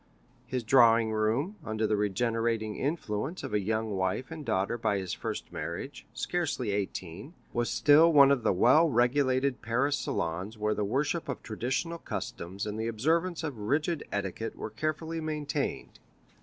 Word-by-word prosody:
His 125 0 -2
drawing 115 -2 +5
room, 115 - 0
under 110 0 -1
the 105 0 +2
regenerating 115 +1 0
influence 140 - -3
of - - -5
a 105 - +3
young 110 +2 -1
wife 95 - -1
and 160 -1 -6
a - - -10
daughter 95 +2 0
by 110 -4 0
his 95 -2 -3
first - - -5
marriage, 85 - -6
scarcely 145 -10 -2
eighteen, 100 - -4 0.2
was 120 -2 0
still 150 - +6
one 140 -3 +7
of 140 -3 +2
the - - +2
well 130 - +5
regulated 130 +1 +2
Paris 125 +5 +1
salons 90 +7 -3
where 105 0 0
the 105 - -1
worship 140 - -1
of 140 - -4
traditional 130 +10 -2
customs 95 - -5
and 105 +1 -4
the 110 - -1
observance 160 +10 0
of 145 -8 -4
rigid 145 +9 0
etiquette 100 +2 -3
were - - -6
carefully 160 +1 -3
maintained. 150 -2 -3
120 Hz, 160 wpm, -29 LUFS, 105-145 Hz, 0.2 s, one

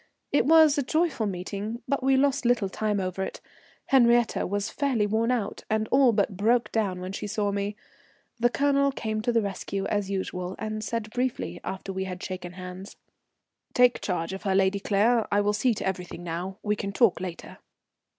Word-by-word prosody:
It 280 -2 +3
was 315 -2 +6
a - - +3
joyful 310 -5 0
meeting, 200 +5 -5
but 280 -1 0
we 265 0 +3
lost 275 0 +2
little 240 -5 +2
time 210 +1 -1
over 185 0 -3
it. 190 - -4 0.5
Henriette 240 -5 +3
was 205 +2 -2
fairly 265 -7 +1
worn 220 +3 +1
out, 235 -5 -1
and 220 0 0
all 265 -2 +5
but 205 -2 0
broke 230 +5 +2
down 195 -5 -1
when 185 +1 -5
she 205 - -5
saw 205 0 -1
me. 200 +1 -2 0.6
The 240 +1 +4
Colonel 280 +1 +2
came 220 -4 -3
to 240 +2 0
the 230 -2 +2
rescue 195 0 -3
as 205 -2 -1
usual, 185 -1 -3
and 215 0 -4
said 220 -1 -3
briefly, 250 +2 -2
after 190 0 -5
we 190 0 -2
had 185 -1 -6
shaken 180 -1 -6
hands: 185 +2 -9 0.8
"Take 250 0 +4
charge 175 -2 -2
of 190 - -6
her, 195 -1 0
Lady 195 +1 +3
Claire, 220 +4 +2
I 205 - +3
will 205 0 +2
see 225 +3 +2
to - - -4
everything 180 -2 -4
now. 175 +3 -4
We 210 0 +1
can 200 -1 -4
talk 215 -5 +3
later." 180 -2 -7
210 Hz, 190 wpm, -27 LUFS, 190-240 Hz, 0.8 s, was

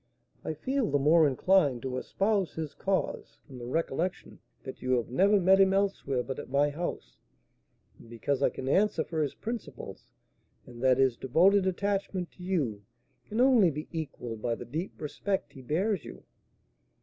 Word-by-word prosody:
I 160 - -3
feel 260 - -1
the 145 - +2
more 155 +3 +5
inclined 140 -3 +2
to 130 -1 -3
espouse 195 +4 0
his 155 -3 -4
cause 195 -1 -2
from 130 -4 -11
the 120 - -7
recollection 165 +5 -2 0.2
that 130 - -8
you 130 0 0
have 120 -2 0
never 200 +9 +4
met 190 +1 +5
him 190 0 +4
elsewhere 190 -10 0
but 135 0 -5
at - - -8
my 145 +2 +2
house, 170 +4 -5 0.8
and 115 - -15
because 130 +4 -2
I - - +4
can 130 - -7
answer 200 +9 +2
for 160 -2 -3
his 145 - -2
principles, 150 - -7 0.6
and 120 -1 -12
that 130 -1 +4
his 130 -3 +3
devoted 185 +9 +3
attachment 190 -1 -2
to - - -17
you 150 - -1 0.5
can 215 - -3
only 245 -8 +6
be 150 0 -6
equalled 125 -8 -5
by 115 0 0
the - - -8
deep 160 +9 -5
respect 190 +6 -3
he 135 - -11
bears 175 - 0
you." - - -11
160 Hz, 175 wpm, -29 LUFS, 130-195 Hz, 0.8 s, only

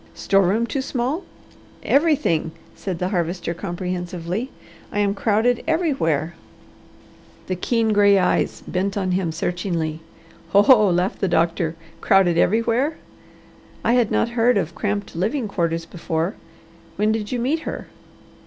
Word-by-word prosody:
"Store 195 0 +2
room 220 +5 +1
too 270 +3 -2
small?" 265 +6 -2 0.6
"Everything!" 280 - +2 0.2
said 185 -3 -4
the 180 +2 -2
Harvester 175 -2 -2
comprehensively. 180 +3 -4 0.4
"I - - -4
am 205 -1 +2
crowded 220 +4 +1
everywhere." 170 - 0 1.1
The 185 - -2
keen 225 +4 +1
gray 200 -1 +5
eyes 185 - +1
bent 195 +2 -1
on 185 -2 -1
him 180 -2 0
searchingly. 165 -1 -2 0.5
"Ho, 200 +1 +7
ho!" 215 -6 +6
laughed 180 +2 0
the 195 - +2
doctor. 165 -1 +1 0.3
"'Crowded 195 -4 +4
everywhere.' 230 - +2 0.9
I 235 - +3
had 240 -3 +3
not 235 - +1
heard 235 0 +2
of 170 -3 -1
cramped 205 -1 -3
living 220 - -1
quarters 165 -4 -1
before. 165 +1 -2 0.6
When 210 +1 +2
did 215 -2 -2
you 250 - -1
meet 265 +7 0
her?" - - -6
200 Hz, 135 wpm, -22 LUFS, 175-230 Hz, 1.1 s, Ho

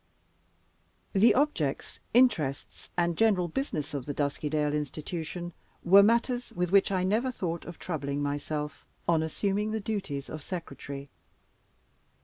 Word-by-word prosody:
The 210 +3 +6
objects, 250 - 0
interests, 165 - +2
and 170 -1 +2
general 200 -5 +3
business 160 - -3
of 140 -2 -4
the 145 - -3
Duskydale 150 +1 0
Institution 160 +4 -4 0.3
were 195 +3 +8
matters 235 +3 +2
with 180 0 0
which 200 0 +5
I 185 -2 +1
never 220 +7 +1
thought 170 -8 -3
of 175 - -8
troubling 145 -4 -3
myself 150 +1 -3 0.2
on 165 -2 +4
assuming 200 +6 0
the 220 0 -1
duties 195 -10 -3
of 155 - -6
Secretary. 140 -5 -6
170 Hz, 130 wpm, -29 LUFS, 150-200 Hz, 0.3 s, were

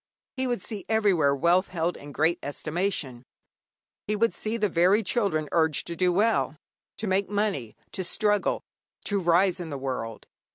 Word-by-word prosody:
He 260 0 -1
would 240 -6 -2
see 210 -3 -5
everywhere 190 -11 +3
wealth 175 +6 +3
held 170 0 -1
in 145 +1 -10
great 160 +5 +1
estimation; 150 -3 -2 0.9
he 210 - 0
would 230 +2 +2
see 220 +2 -2
the 210 -2 +2
very 185 +5 +3
children 195 - 0
urged 160 -3 +2
to 170 - -4
do 180 +1 +2
well, 205 -4 +2 0.4
to 220 - -3
make 195 0 +1
money, 200 - -1 0.2
to 190 - -3
struggle, 205 +2 +1 0.4
to 205 -1 +1
rise 180 +1 +3
in 170 -2 -5
the 140 - -4
world. 125 -4 -4
180 Hz, 165 wpm, -27 LUFS, 155-205 Hz, 0.9 s, everywhere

